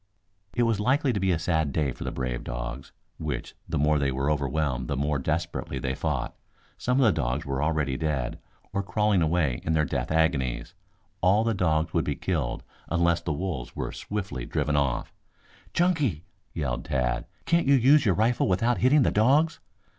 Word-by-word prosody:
It 120 - +3
was 115 -3 +1
likely 130 +4 +2
to 100 - -1
be 95 0 +2
a 85 - +2
sad 80 -3 0
day 75 -2 0
for - - -7
the - - -3
brave 65 -2 -3
dogs, 60 +2 -5 0.3
which, - - -4 0.2
the - - -1
more 75 +1 +3
they 70 -1 +1
were 70 +3 0
overwhelmed, 70 -2 -1
the 70 - -2
more 70 +1 0
desperately 80 -1 -2
they 65 0 -2
fought. - - -2 0.4
Some 125 +2 +1
of 135 - +5
the 110 - +6
dogs 70 -2 -1
were 70 -1 -2
already 75 -4 0
dead, 70 -6 -2 0.3
or 100 - +1
crawling 100 0 +1
away 80 -6 +1
in 80 - 0
their 75 -1 +3
death - - -2
agonies. 80 -6 0 0.5
All 95 +4 +4
of - - -1
the - - +2
dogs 80 -4 +1
would - - +1
be - - -1
killed - - -2 0.3
unless 85 0 +2
the 85 - -3
wolves 80 -5 -4
were - - -3
swiftly 95 -11 -4
driven 75 +3 -1
off. 70 -4 0 0.6
"Chunky," 150 - +1 0.3
yelled 65 -6 -3
Tad, 65 -2 -1 0.2
"can't 170 -3 +2
you 140 - +6
use 135 +3 +5
your 95 -6 +3
rifle 115 +3 +2
without 115 +6 +2
hitting 135 +3 +5
the - - +2
dogs?" 140 +9 +3
80 Hz, 190 wpm, -27 LUFS, 70-105 Hz, 0.6 s, the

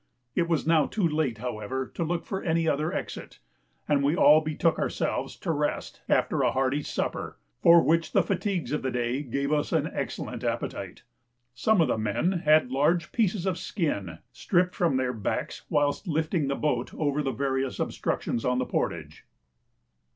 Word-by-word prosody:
It 170 -1 0
was 165 -3 +1
now 160 -3 +4
too 200 -6 0
late, 150 -7 -1
however, 125 +2 -3
to - - -2
look 170 +1 -2
for 190 - -3
any 165 -1 +1
other 155 +1 +1
exit, - - -6 0.5
and 145 -2 +3
we 145 +4 +2
all 155 -3 +7
betook 155 +1 0
ourselves - - -2
to - - -1
rest - - -2
after - - +2
a - - +3
hearty 135 +3 +1
supper, - - -3 0.2
for 170 0 +7
which 165 0 +2
the - - +4
fatigues 195 -8 -2
of 150 - -1
the 130 - -1
day 125 +2 -1
gave 140 +1 -2
us 150 -1 0
an - - +1
excellent - - -4
appetite. - - -4 0.5
Some 195 - +3
of 160 - +3
the 115 - 0
men 110 - 0
had 155 -7 +3
large 160 +6 +1
pieces 205 -5 0
of 190 - +1
the - - -8
skin 100 - -2
stripped 180 +1 +1
from 165 -7 +1
their 130 -1 0
backs 105 -4 -3
whilst 145 +6 +1
lifting 160 -1 0
the 140 - 0
boat 125 -5 -1
over 150 -1 0
the 140 - -1
various 135 +1 -2
obstructions 115 - -2
on 125 0 +1
the 125 - 0
portage. 80 -10 -3
150 Hz, 180 wpm, -27 LUFS, 130-165 Hz, 0.5 s, all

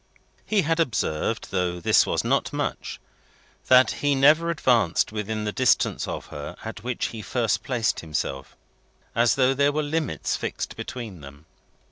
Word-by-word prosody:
He 210 -3 +2
also 165 0 +2
observed 115 - -1
though 90 -2 -1
this 85 - +4
was - - 0
not - - 0
much - - -4 0.7
that 130 0 +6
he 145 -1 +2
never 150 +5 +5
advanced 120 - +2
within 110 0 -3
the 105 - -2
distance 130 +1 +1
of - - -5
her 75 0 -7
at 110 -1 -7
which 125 -1 -2
he 110 - -7
first 115 +1 0
placed 120 -4 -1
himself: 70 -4 -4 0.6
as 115 0 +3
though 130 0 +3
there 140 +1 +2
were 155 +1 -1
limits 145 - -2
fixed - - -4
between 110 -9 -7
them. 70 +2 -13
115 Hz, 155 wpm, -25 LUFS, 90-140 Hz, 0.7 s, that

